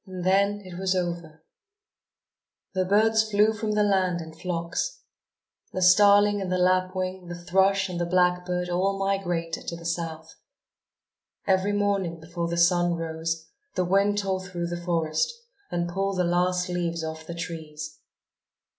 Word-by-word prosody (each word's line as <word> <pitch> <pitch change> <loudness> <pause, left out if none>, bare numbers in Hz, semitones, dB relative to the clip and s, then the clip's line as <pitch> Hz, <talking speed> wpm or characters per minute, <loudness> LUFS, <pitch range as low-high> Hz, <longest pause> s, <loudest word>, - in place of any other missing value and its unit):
And 185 -1 -6
then 200 +2 +3
it 180 -1 -8
was 190 0 +1
over. 170 -3 -3 1.3
The 185 -1 +1
birds 220 +3 +3
flew 210 +1 +4
from 215 0 -2
the 210 0 +3
land 190 -3 +2
in 160 -1 -8
flocks. 180 - -3 0.7
The 185 - -2
starling 205 +2 +6
and 185 -1 -3
the 185 - +2
lapwing, 185 0 0
the 175 - -5
thrush 190 +2 +2
and 175 -2 -4
the 175 - 0
blackbird 180 0 +1
all 190 +3 0
migrated 175 -4 -2
to 170 - -3
the 170 0 -11
south. 165 -1 -4 1.1
Every 190 +1 +2
morning 200 -5 0
before 170 +1 -4
the 170 0 -2
sun 175 0 +3
rose 165 0 -3 0.3
the 185 - +1
wind 200 +3 +2
tore 190 -2 -1
through 175 -2 -4
the 175 0 -5
forest, 160 -3 0 0.4
and 175 0 -1
pulled 195 +2 -2
the 180 - +2
last 180 +1 +1
leaves 170 -2 -2
off 160 0 -6
the 170 - -5
trees. 155 -2 -7
180 Hz, 155 wpm, -26 LUFS, 170-195 Hz, 1.3 s, starling